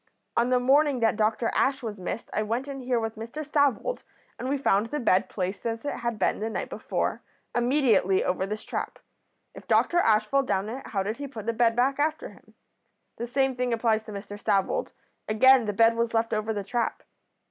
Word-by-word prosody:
'On 235 Hz, +1 st, +2 dB
the 250 Hz, 0 st, +3 dB
morning 275 Hz, +2 st, +3 dB
that 225 Hz, -1 st, +3 dB
Dr 220 Hz, +1 st, +1 dB
Ash 265 Hz, -1 st, +1 dB
was 215 Hz, -3 st, -5 dB
missed 185 Hz, +5 st, -5 dB
I -, -, 0 dB
went 230 Hz, +5 st, -2 dB
in 275 Hz, -1 st, -6 dB
here 250 Hz, -1 st, 0 dB
with 225 Hz, -1 st, -4 dB
Mr 235 Hz, +8 st, -6 dB
Stavold, 285 Hz, -, +1 dB, 0.4 s
and 255 Hz, -, -3 dB
we 285 Hz, -, +1 dB
found 215 Hz, -5 st, +2 dB
the 295 Hz, +6 st, -3 dB
bed 195 Hz, -7 st, +2 dB
placed 190 Hz, 0 st, -4 dB
as 230 Hz, +2 st, -3 dB
it 285 Hz, -, -1 dB
had 235 Hz, -2 st, -3 dB
been 190 Hz, -, +1 dB
the 220 Hz, +2 st, -2 dB
night -, -, -4 dB
before, -, -, -2 dB, 0.3 s
immediately 240 Hz, -7 st, +3 dB
over 185 Hz, +1 st, -1 dB
this 215 Hz, +1 st, -5 dB
trap. -, -, -4 dB, 0.6 s
If -, -, -13 dB
Dr 350 Hz, -, +3 dB
Ash 215 Hz, -8 st, +3 dB
fell 275 Hz, +5 st, +2 dB
down 205 Hz, -6 st, -1 dB
it 260 Hz, +4 st, -7 dB
how 195 Hz, -3 st, -1 dB
did 215 Hz, +3 st, -3 dB
he 285 Hz, 0 st, -5 dB
put 225 Hz, -6 st, -8 dB
the 230 Hz, -, 0 dB
bed 230 Hz, 0 st, +2 dB
back 265 Hz, +3 st, +1 dB
after 310 Hz, +2 st, -1 dB
him? -, -, -19 dB, 0.6 s
The 235 Hz, -, -4 dB
same 265 Hz, +1 st, +1 dB
thing 250 Hz, -1 st, -1 dB
applies 225 Hz, -1 st, +1 dB
to 215 Hz, -, -8 dB
Mr 205 Hz, 0 st, -7 dB
Stavold; 200 Hz, -, 0 dB, 0.4 s
again 250 Hz, +3 st, +5 dB
the 210 Hz, -, 0 dB
bed 225 Hz, +3 st, +4 dB
was 230 Hz, 0 st, -1 dB
left 225 Hz, 0 st, +1 dB
over 215 Hz, +1 st, -1 dB
the 205 Hz, -2 st, -3 dB
trap.' 230 Hz, +3 st, -2 dB
230 Hz, 215 wpm, -26 LUFS, 215-265 Hz, 0.6 s, again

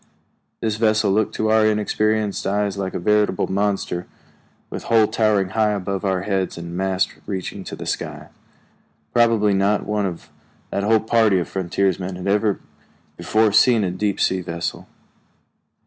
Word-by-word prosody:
This 110 Hz, -1 st, -1 dB
vessel 110 Hz, -2 st, +2 dB
looked 105 Hz, +2 st, +1 dB
to 110 Hz, 0 st, 0 dB
our 110 Hz, 0 st, +4 dB
inexperienced 110 Hz, 0 st, 0 dB
eyes 100 Hz, 0 st, 0 dB
like 95 Hz, -1 st, -4 dB
a -, -, -1 dB
veritable 105 Hz, +1 st, +2 dB
monster, 95 Hz, -3 st, -1 dB, 0.6 s
with -, -, -6 dB
hull 115 Hz, -2 st, +4 dB
towering 105 Hz, -3 st, +1 dB
high 105 Hz, +1 st, +1 dB
above 100 Hz, -1 st, -3 dB
our 95 Hz, -2 st, 0 dB
heads 95 Hz, -3 st, -1 dB
and 85 Hz, 0 st, -7 dB
masts 95 Hz, 0 st, 0 dB
reaching 95 Hz, 0 st, -4 dB
to -, -, -6 dB
the -, -, -8 dB
sky. -, -, -4 dB, 0.8 s
Probably 115 Hz, -3 st, +3 dB
not 100 Hz, +2 st, +1 dB
one 105 Hz, -2 st, 0 dB
of 85 Hz, -3 st, -8 dB, 0.4 s
that 100 Hz, -, -1 dB
whole 110 Hz, +1 st, +3 dB
party 110 Hz, -3 st, +3 dB
of 90 Hz, -, -1 dB
frontiersmen 95 Hz, 0 st, -1 dB
had 90 Hz, -, -7 dB
ever 105 Hz, 0 st, +1 dB, 0.6 s
before 110 Hz, 0 st, +2 dB
seen 115 Hz, +1 st, +5 dB
a 90 Hz, -, -1 dB
deep 100 Hz, +2 st, -2 dB
sea 95 Hz, 0 st, +1 dB
vessel. 85 Hz, -1 st, -5 dB
100 Hz, 155 wpm, -21 LUFS, 95-110 Hz, 0.8 s, seen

